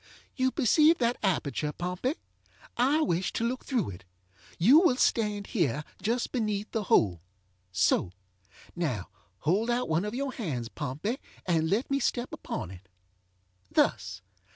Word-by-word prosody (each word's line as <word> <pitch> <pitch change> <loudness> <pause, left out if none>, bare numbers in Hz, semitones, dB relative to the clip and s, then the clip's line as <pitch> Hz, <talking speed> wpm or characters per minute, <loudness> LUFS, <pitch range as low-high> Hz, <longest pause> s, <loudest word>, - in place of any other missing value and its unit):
ŌĆ£You 260 0 +2
perceive 310 +4 +5
that 240 0 +1
aperture, 155 -6 0
Pompey. 180 - -2 0.6
I 275 +6 +3
wish 180 - 0
to - - -1
look 250 +2 -1
through 240 - -1
it. 90 0 -11 0.5
You 245 - +7
will 345 -8 +4
stand 210 -5 +1
here 150 - +1 0.2
just 235 +3 0
beneath 215 -4 -1
the 220 -3 -2 0.9
holeŌĆöso. 90 - +2 0.6
Now, 135 - -2 0.3
hold 200 +10 +1
out 245 +1 +1
one 160 +3 +2
of 210 +2 -4
your 275 +1 -2
hands, 130 - -3
Pompey, 150 - -3 0.3
and 160 -3 +1
let 225 +9 0
me 275 - +2
step 240 -1 -1
upon 90 0 -6 0.9
itŌĆöthus. - - +1
210 Hz, 135 wpm, -29 LUFS, 160-250 Hz, 0.9 s, You